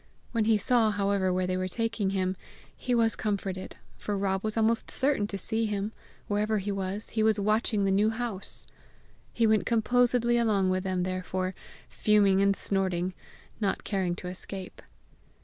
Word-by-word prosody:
When 230 -3 +1
he 220 -1 +4
saw, 230 +1 +3
however, 200 -2 +1
where 185 0 0
they 185 0 -1
were 185 0 -1
taking 225 0 -1
him, 190 -1 0 0.4
he 250 - -1
was 225 -2 +3
comforted, 195 -3 -3 0.2
for 205 -1 -2
Rob 195 -1 -1
was 215 +1 -2
almost 225 +1 +2
certain 270 -6 +2
to 200 - -4
see 220 +3 -1
him: 205 0 -2 0.4
wherever 210 +1 +1
he 205 +1 -2
was, 195 +1 -3
he 220 - -1
was 215 -1 +3
watching 215 0 +1
the 195 - +2
New 205 +3 +3
House! 225 -4 -4 0.7
He 230 - +2
went 220 -1 +3
composedly 240 +1 +3
along 200 -5 +2
with 185 0 0
them 185 -1 0
therefore, 185 0 -2 0.3
fuming 200 -2 +3
and 200 0 +3
snorting, 185 -2 0 0.5
not 200 -3 -1
caring 185 -4 -1
to 180 - -7
escape. 185 +1 -8
205 Hz, 165 wpm, -28 LUFS, 190-220 Hz, 0.7 s, he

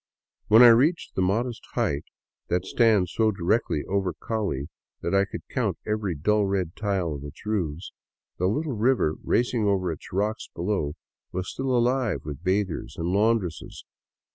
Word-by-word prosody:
When 110 +3 +8
I 120 - +10
reached 140 +9 +3
the - - -1
modest 110 +6 0
height 70 +1 0 0.4
that 90 +1 0
stands 105 -4 +3
so 110 -1 +3
directly 95 -4 0
over 95 -2 -1
Call 110 -3 -2 0.5
that - - -2
I 100 0 +4
could - - -8
count - - -1
every 105 -5 -1
dull 105 +7 +2
red 95 -4 -1
tile 95 -6 -1
of 70 -1 -7
its 75 +7 -11
roofs, 90 -6 -2 0.5
the 90 - +2
little 145 +8 -1
river 110 -8 +2
racing 120 -2 +1
over 95 -3 +1
its 80 - -9
rocks 105 +4 -1
below 85 -5 -1 0.4
was 95 0 -3
still 135 0 -3
alive 125 -1 +1
with 75 +2 -7
bathers 95 -1 -1
and 85 +1 -2
laundresses. 100 -4 0
100 Hz, 160 wpm, -26 LUFS, 90-115 Hz, 0.5 s, I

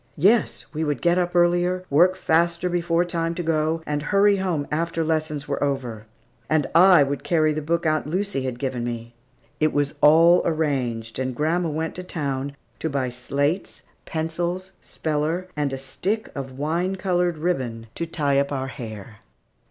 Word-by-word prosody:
Yes, 205 +9 +3
we 155 +1 -1
would 150 -2 -1
get 175 +1 +3
up 175 0 -1
earlier, 175 +1 +2
work 175 +6 +5
faster 170 0 +1
before 175 0 +1
time 165 -1 -2
to 175 - -3
go, 160 0 0
and 150 0 -2
hurry 200 +5 +3
home 175 -6 -1
after 165 +1 -1
lessons 155 -2 -1
were 140 0 -1
over. 125 -6 -3 0.4
And 155 -2 +2
I 180 -3 +7
would 140 0 -3
carry 155 0 +2
the 155 - -3
book 170 +3 -1
Aunt 155 -1 +1
Lucy 185 -2 -1
had 130 -2 -3
given 130 -2 -3
me. 120 -1 -5 0.5
It 155 0 +3
was 145 -1 0
all 165 +4 +7
arranged, 130 -9 -1
and 130 -1 -2
grandma 165 +4 0
went 160 +2 -2
to 180 - -5
town 140 -5 -3 0.2
to 160 - -2
buy 135 -3 -1
slates, 140 +8 -2 0.2
pencils, 170 +4 -3
speller, 160 +4 -2
and 145 -2 -1
a 135 - -3
stick 185 +11 -3
of 135 -2 -6
wine 170 +6 -1
colored 180 -3 0
ribbon 130 -9 -2
to 170 - -4
tie 145 -4 +1
up 140 +1 0
our 135 -1 -2
hair. 110 -4 -8
155 Hz, 170 wpm, -24 LUFS, 140-175 Hz, 0.5 s, I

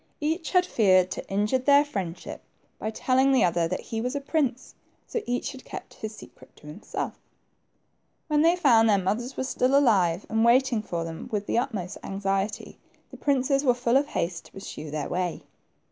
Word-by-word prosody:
Each 320 +2 -1
had 365 -1 +3
feared 185 - +3
to - - -6
injure 210 +6 +1
their 285 +3 +5
friendship 190 -11 -5 0.4
by 215 - -2
telling 260 +4 +2
the 265 - +4
other 170 -1 +2
that 185 - -3
he 225 -1 -4
was 250 +4 -2
a - - 0
prince, 275 -3 -1 0.3
so 465 - -3
each 245 0 -1
had 265 -1 -11
.kept - - -9
his 220 0 -7
secret - - -15
to - - -19
himself 150 +8 -6 1.1
When 300 -1 +2
they 335 +2 +5
found 235 -10 +5
their 205 - +5
mothers 215 +8 -2
were - - -1
still 260 +1 +2
alive, 195 -10 +3
and 225 0 +1
waiting 240 -1 +4
for 170 -5 -4
them 165 -1 -7
with 210 -2 -2
the 235 - +1
utmost 200 -7 -4
anxiety, 195 +1 -3 0.3
the - - -10
princes 275 0 +1
were 250 -3 +3
full 245 0 +1
of 280 +2 +3
haste 175 - -3
to - - -18
pursue 155 -5 -8
their 150 -1 -3
way. 180 -1 -2
225 Hz, 190 wpm, -26 LUFS, 195-270 Hz, 1.1 s, their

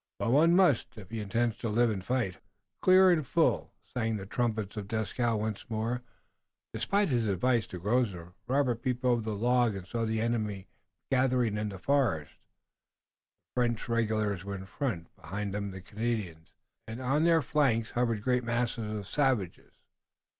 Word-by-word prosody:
"But - - 0
one 165 +6 +5
must, 175 -12 +3
if 105 -1 -11
he 115 - -3
intends 115 +3 0
to 115 - -3
live 115 +2 +3
and 95 -3 -4
fight." 100 -6 -1 0.4
Clear 185 0 +7
and 160 -3 +2
full 130 - +1 0.2
sang 115 -3 0
the 95 - -7
trumpets 110 -1 -2
of 105 -2 -5
Dieskau 115 +2 0
once 105 0 -4
more. 115 +2 -1 0.7
Despite 200 -1 +1
his 120 -4 +1
advice 115 +4 +1
to 90 - -7
Grosvenor, 95 -3 -1
Robert 130 -3 +1
peeped 125 0 -2
over 120 -2 +3
the 110 -1 -3
log 120 0 +2
and 95 -2 -6
saw 115 +4 -2
the 110 0 0
enemy 110 -4 -1 0.5
gathering 125 -4 +2
in 105 0 -2
the 95 - -7
forest. 110 - +1 1.2
The 125 - +1
French 120 -2 0
regulars 110 -4 0
were 100 0 -5
in 95 0 -7
front, 100 - -4
behind 100 +1 -5
them 100 0 -2
the 95 -1 -8
Canadians, 100 -6 -4 0.4
and 110 +2 -6
on 135 +4 +1
the 165 -1 +5
flanks 120 -7 +1
hovered 115 -3 0
great 125 0 +1
masses 120 -2 -1
of 100 - -6
savages. 125 - 0
115 Hz, 170 wpm, -30 LUFS, 105-125 Hz, 1.2 s, Clear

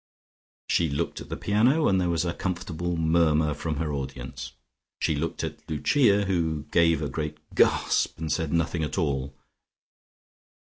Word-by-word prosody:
She 85 -2 +2
looked 70 - -2
at - - -10
the - - -4
piano, 125 +10 +3
and 95 -1 +3
there 90 - 0
was 85 0 0
a 85 - -1
comfortable 85 -2 -3
murmur 80 -2 +3
from 75 +2 -3
her 75 0 -2
audience. 65 -2 -6 0.5
She 80 - +1
looked 80 +3 -3
at - - -6
Lucia, 100 - +3
who 80 -5 0
gave 85 -3 +3
a - - -1
great 75 -1 -4 0.2
gasp, - - +2
and 80 -1 -3
said 80 -1 -1
nothing 85 0 0
at 75 - -3
all. 70 -5 -1
80 Hz, 155 wpm, -26 LUFS, 75-90 Hz, 0.5 s, piano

